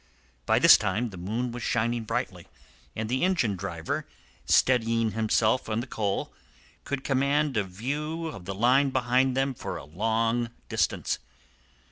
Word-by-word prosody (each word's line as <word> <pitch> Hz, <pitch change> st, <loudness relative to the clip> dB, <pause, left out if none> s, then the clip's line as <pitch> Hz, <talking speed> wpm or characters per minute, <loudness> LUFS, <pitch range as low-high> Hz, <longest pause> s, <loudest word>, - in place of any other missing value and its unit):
By -, -, +4 dB
this -, -, +8 dB
time 120 Hz, +1 st, -1 dB
the -, -, -9 dB
moon 110 Hz, +8 st, -3 dB
was 120 Hz, +1 st, -6 dB
shining 115 Hz, +1 st, 0 dB
brightly, -, -, -3 dB, 0.5 s
and 110 Hz, 0 st, -3 dB
the 130 Hz, +6 st, 0 dB
engine 170 Hz, -, +1 dB
driver, 85 Hz, -4 st, -4 dB, 0.4 s
steadying 115 Hz, -3 st, +3 dB
himself 110 Hz, +2 st, +1 dB
on 110 Hz, +1 st, 0 dB
the 120 Hz, -, -3 dB
coal, 105 Hz, -5 st, -2 dB, 0.5 s
could 140 Hz, -2 st, -3 dB
command 140 Hz, +1 st, +1 dB
a 110 Hz, -, +2 dB
view 145 Hz, -, -4 dB
of 125 Hz, -, -7 dB
the 95 Hz, +1 st, -4 dB
line 130 Hz, +6 st, +4 dB
behind 130 Hz, 0 st, +1 dB
them 135 Hz, 0 st, +1 dB
for -, -, -6 dB
a -, -, -9 dB
long 115 Hz, +7 st, 0 dB, 0.2 s
distance. -, -, 0 dB
120 Hz, 150 wpm, -27 LUFS, 110-130 Hz, 0.5 s, this